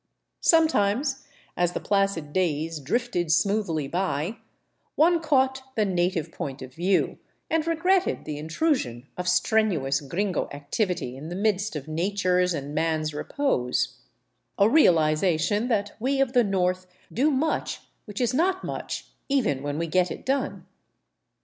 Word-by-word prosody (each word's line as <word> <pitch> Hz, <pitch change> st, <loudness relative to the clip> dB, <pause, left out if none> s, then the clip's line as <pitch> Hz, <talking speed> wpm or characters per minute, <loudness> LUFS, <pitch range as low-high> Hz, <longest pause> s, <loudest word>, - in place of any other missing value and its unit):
Sometimes, 275 Hz, -5 st, +2 dB, 0.3 s
as 175 Hz, 0 st, +1 dB
the -, -, -2 dB
placid 195 Hz, -7 st, 0 dB
days 165 Hz, -3 st, 0 dB
drifted 175 Hz, -, -1 dB
smoothly 175 Hz, -4 st, +1 dB
by, 180 Hz, -, -2 dB, 0.6 s
one 335 Hz, +2 st, +4 dB
caught 265 Hz, -4 st, +2 dB
the 215 Hz, -, +2 dB
native 180 Hz, -3 st, 0 dB
point 135 Hz, -1 st, -6 dB
of 130 Hz, 0 st, -10 dB
view, 180 Hz, +6 st, +1 dB, 0.3 s
and 325 Hz, 0 st, +1 dB
regretted 360 Hz, +3 st, +1 dB
the 150 Hz, -1 st, -5 dB
intrusion 155 Hz, -, -1 dB
of 180 Hz, 0 st, -4 dB
strenuous 180 Hz, -7 st, +2 dB
gringo 180 Hz, +6 st, -2 dB
activity 145 Hz, -, -2 dB
in 150 Hz, +4 st, -8 dB
the 175 Hz, -, -5 dB
midst 205 Hz, -1 st, 0 dB
of 150 Hz, -1 st, -5 dB
nature's 180 Hz, +1 st, +1 dB
and 145 Hz, 0 st, -5 dB
man's 155 Hz, -1 st, 0 dB
repose; 145 Hz, -, -1 dB, 0.6 s
a 200 Hz, -, +5 dB
realization 175 Hz, -, +3 dB
that 205 Hz, -4 st, 0 dB
we 270 Hz, +4 st, 0 dB
of 270 Hz, -2 st, +1 dB
the 245 Hz, -2 st, +5 dB
North 185 Hz, -2 st, 0 dB, 0.3 s
do 275 Hz, +6 st, +3 dB
much 305 Hz, +2 st, -1 dB, 0.2 s
which 205 Hz, -2 st, -7 dB
is 245 Hz, 0 st, +1 dB
not 370 Hz, +6 st, +1 dB
much -, -, -5 dB, 0.2 s
even 235 Hz, -, +1 dB
when 145 Hz, +1 st, -3 dB
we 165 Hz, -, -1 dB
get 180 Hz, +2 st, +2 dB
it -, -, -7 dB
done. 270 Hz, 0 st, -1 dB
185 Hz, 140 wpm, -26 LUFS, 155-245 Hz, 0.6 s, a